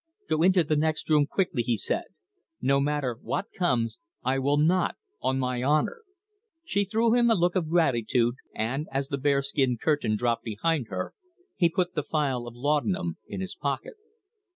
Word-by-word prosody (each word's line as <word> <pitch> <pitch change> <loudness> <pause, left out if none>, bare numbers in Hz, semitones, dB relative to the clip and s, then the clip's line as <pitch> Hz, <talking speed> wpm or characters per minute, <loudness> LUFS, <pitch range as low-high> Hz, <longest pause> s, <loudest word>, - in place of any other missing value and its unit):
"Go 155 - +1
into 185 0 +5
the 155 0 0
next 155 +1 0
room 150 -2 +5
quickly," 180 -8 0
he 120 -1 0
said. - - -1 0.5
"No 140 +1 +2
matter 140 -5 -1
what - - -3
comes, 125 -10 0 0.2
I 135 +1 +1
will 140 +2 +2
not 170 +4 +2 0.3
on 130 - +1
my 125 -1 -1
honour!" 155 - +1 0.6
She 200 -9 +1
threw 225 +3 +2
him 240 -1 +4
a 225 - +5
look 175 -1 +1
of 170 -4 0
gratitude, 120 -7 +2 0.2
and, 130 +8 -2
as 135 0 -2
the 140 - -2
bearskin 140 -2 +1
curtain 145 -5 +1
dropped 120 0 0
behind 125 +5 -1
her, 95 -2 -4 0.4
he 170 -3 +3
put 180 +1 -1
the - - 0
phial 135 -5 -1
of 120 - -9
laudanum 120 - 0
in 100 -2 -5
his 95 - -4
pocket. 140 -2 -3
140 Hz, 175 wpm, -27 LUFS, 120-165 Hz, 0.6 s, into